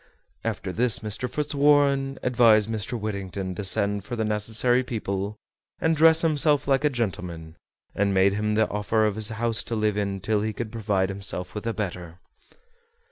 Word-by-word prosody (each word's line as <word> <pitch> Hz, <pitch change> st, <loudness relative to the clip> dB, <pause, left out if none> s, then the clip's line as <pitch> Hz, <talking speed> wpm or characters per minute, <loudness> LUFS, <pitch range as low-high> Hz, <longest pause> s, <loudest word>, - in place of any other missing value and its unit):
After 95 Hz, -, -3 dB
this 120 Hz, +3 st, +2 dB
Mr. 110 Hz, +3 st, -3 dB
Fitzwarren 140 Hz, -1 st, +2 dB
advised 115 Hz, -4 st, +4 dB
Mr. 115 Hz, +2 st, -3 dB
Whittington 100 Hz, -3 st, -4 dB
to 105 Hz, -, -5 dB
send 100 Hz, 0 st, 0 dB
for 120 Hz, -, -5 dB
the 110 Hz, -1 st, -1 dB
necessary 110 Hz, +4 st, +1 dB
people 105 Hz, -3 st, -4 dB, 0.4 s
and 160 Hz, 0 st, +2 dB
dress 160 Hz, +1 st, +6 dB
himself 150 Hz, -3 st, +3 dB
like 135 Hz, +1 st, +2 dB
a 150 Hz, -, +4 dB
gentleman, 90 Hz, -, -4 dB, 0.4 s
and 100 Hz, 0 st, +1 dB
made 95 Hz, 0 st, +3 dB
him 105 Hz, +1 st, -1 dB
the 110 Hz, 0 st, +3 dB
offer 105 Hz, +1 st, 0 dB
of 105 Hz, -, +1 dB
his 110 Hz, 0 st, -2 dB
house 115 Hz, 0 st, -1 dB
to 115 Hz, -, -4 dB
live 105 Hz, -1 st, 0 dB
in 100 Hz, -1 st, -2 dB
till 105 Hz, +2 st, 0 dB
he 110 Hz, 0 st, -2 dB
could 110 Hz, 0 st, -5 dB
provide 100 Hz, -4 st, 0 dB
himself 95 Hz, -2 st, -5 dB
with 105 Hz, +2 st, -5 dB
a 115 Hz, -, 0 dB
better. 90 Hz, -5 st, -5 dB
110 Hz, 175 wpm, -25 LUFS, 100-125 Hz, 0.4 s, dress